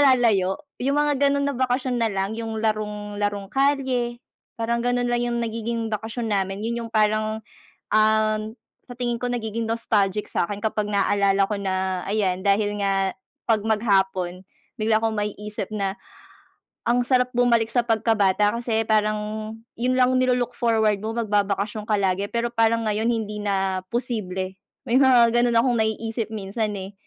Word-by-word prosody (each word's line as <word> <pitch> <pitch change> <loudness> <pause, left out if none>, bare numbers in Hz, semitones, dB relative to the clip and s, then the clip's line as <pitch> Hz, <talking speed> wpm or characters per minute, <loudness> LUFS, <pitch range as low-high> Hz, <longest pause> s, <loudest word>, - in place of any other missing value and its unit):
lalayo. 205 -7 +2 0.3
Yung 275 +3 +1
mga 295 -2 +2
ganun 280 0 +1
na 280 - -2
bakasyon 255 -1 0
na 225 - +2
lang 195 +2 -2
yung 225 -1 -4
larong 210 -1 -2
larong 205 -1 -1
kalye, 265 -4 +1 0.4
parang 235 +1 0
ganon 245 0 +1
lang 240 0 +1
yung 240 0 -1
nagiging 230 0 -3
bakasyon 225 +2 -3
namin. 195 0 -1
Yun 235 0 -3
yung - - -18
parang, 215 0 +1 0.5
um, 215 0 +3 0.5
sa 245 - -9
tingin 240 -1 -1
ko 245 -1 -2
nagiging 230 -1 -3
nostalgic 210 -3 0
sa'kin 200 +3 -1
kapag 215 -1 -1
naalala 200 0 +2
ko 210 - -2
na 190 -1 -1
ayan, 190 -3 0
dahil 205 +1 +2
nga 195 -1 +1 0.4
'pag 220 -2 +3
maghapon, 190 -4 +1 0.4
bigla 215 0 +3
kong 225 -1 0
maiisip 210 -1 -4
na 195 -2 -1 0.9
ang 245 +1 +3
sarap 250 -1 +2
bumalik 235 -2 +3
sa 245 - +3
pagkabata 210 -2 +2
kasi 230 -2 0
parang 215 -1 +2 0.6
yun 250 +2 +1
lang 255 0 +4
nilo-look 250 -1 +1
forward 220 -3 +2
mo 220 - -2
magbabakasyon 210 -1 0
ka 210 - +4
lagi. 195 +1 +1
Pero 235 0 0
parang 230 0 +2
ngayon 215 +2 0
hindi 210 -2 -2
na 190 -2 0
posible. 190 -6 -3 0.3
May 240 - +3
mga 245 -3 +5
ganon 240 -1 +3
akong 245 0 +2
naiisip 225 0 -2
minsan, 210 +1 -2
eh. 190 +2 -7
220 Hz, 155 wpm, -24 LUFS, 205-235 Hz, 0.9 s, mga